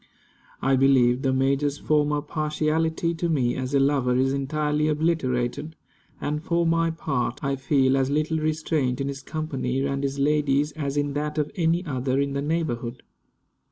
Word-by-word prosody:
I 135 0 +3
believe 130 -2 +4
the 135 - +1
major's 140 +2 +1
former 150 -1 +1
partiality 155 +2 -1
to 170 +1 -2
me 130 -6 +1
as 130 +1 -2
a - - +5
lover 135 -3 +2
is 135 +1 +2
entirely 150 +2 0
obliterated; 150 -2 -1 0.4
and 150 +1 -2
for 170 0 +1
my 165 0 +2
part, 140 -5 -2
I 140 0 0
feel 135 -1 +2
as 135 -1 +1
little 155 +2 0
restraint 155 -4 -1
in 135 - -1
his 140 0 -6
company 135 -4 -2
and 140 0 -1
his 140 0 -2
lady's 145 0 +2
as 145 -2 -4
in 145 -1 0
that 150 +1 -3
of 150 -1 -1
any 170 +1 +1
other 130 -2 -1
in 140 0 0
the 140 - -1
neighborhood. 135 -6 -2
145 Hz, 165 wpm, -25 LUFS, 135-155 Hz, 0.4 s, a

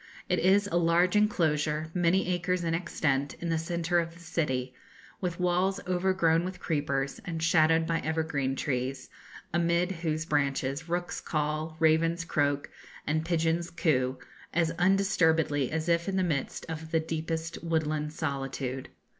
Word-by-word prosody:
It - - +1
is 195 +3 +4
a 185 -4 0
large 175 +2 +3
enclosure, 160 -6 +1
many 180 +1 +2
acres 180 0 -1
in 165 -1 0
extent, 145 -5 0
in 170 - -5
the 165 -1 +1
centre 170 +1 0
of 165 0 -3
the - - -15
city, 130 -6 -2 0.5
with 180 -2 -3
walls 180 +2 +1
overgrown 180 -2 +2
with 185 0 -5
creepers, 140 -3 -1
and 165 -2 -4
shadowed 165 0 +4
by 165 0 0
evergreen 155 -4 -1
trees, 130 -1 -2 0.4
amid 170 +1 +2
whose 160 -3 -2
branches 145 0 -1
rooks 175 +1 -2
caw, 155 +1 -2
ravens 165 +1 +2
croak, 145 -3 0 0.3
and 155 +2 0
pigeons 165 0 0
coo, 130 -6 +1 0.4
as 165 -1 +2
undisturbedly 165 -7 +3
as 160 +1 -2
if 170 +2 +2
in 195 - -2
the 190 - +2
midst 155 -6 -2
of 160 0 -6
the 160 - +2
deepest 160 +1 -4
woodland 155 -2 -1
solitude. 135 -3 -3
165 Hz, 145 wpm, -29 LUFS, 150-175 Hz, 0.5 s, is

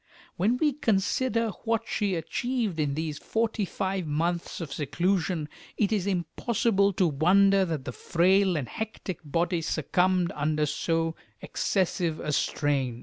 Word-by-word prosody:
When 215 +8 +2
we 300 +1 +2
consider 230 0 +1
what 230 -1 0
she 200 -3 0
achieved 215 - -2
in 145 -2 0
these 155 -1 -3
forty 225 -2 -1
five 190 -2 -2
months 170 +3 -1
of 155 -6 -5
seclusion, 175 +1 0 0.3
it 205 -1 +1
is 200 -3 0
impossible 200 +3 +1
to 185 - +2
wonder 190 +6 +4
that 160 -6 -3
the - - -3
frail 185 +6 +2
and 135 -5 -3
hectic 220 - -5
body 170 +4 0
succumbed 180 +3 +1
under 150 +1 0
so 165 +2 0 0.3
excessive 175 -4 -1
a 150 - -3
strain. 135 -5 0
180 Hz, 140 wpm, -27 LUFS, 155-200 Hz, 0.3 s, wonder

